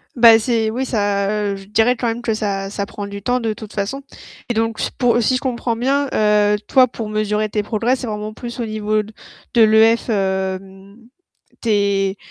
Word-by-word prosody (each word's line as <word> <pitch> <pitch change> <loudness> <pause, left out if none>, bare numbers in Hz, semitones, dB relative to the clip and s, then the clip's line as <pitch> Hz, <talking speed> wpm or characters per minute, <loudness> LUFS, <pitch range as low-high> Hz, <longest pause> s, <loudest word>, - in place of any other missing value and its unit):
Ben 230 -2 +7
c'est 225 -1 0
oui 250 +4 -2
ça, 205 -4 0
heu, 210 -1 -1
je 195 - -12
dirais 225 +4 +2
quand 240 - -2
même 230 +1 -2
que 230 -2 -1
ça 200 -2 -2
ça 200 0 -3
prend 205 0 -7
du 200 0 -7
temps 245 +4 0
de 225 -1 -1
toute 215 0 -9
façon. 205 +7 -3 0.5
Et - - +1
donc 225 0 -1 0.2
pour 240 -1 +3
si 255 +3 +2
je 255 - -2
comprends 240 -2 -2
bien, 275 +4 0
heu, 210 -1 +3
toi 260 -1 +5
pour 225 -2 -6
mesurer 215 0 -1
tes 210 0 -1
progrès, 230 +4 0
c'est 250 - -6
vraiment 210 0 -5
plus 240 +2 -8
au - - -2
niveau 215 0 -1
de 220 +2 -4
l'EF, 220 +2 +4
hem, 190 0 -3 0.6
tes 200 -3 +1
215 Hz, 195 wpm, -19 LUFS, 205-235 Hz, 0.6 s, Ben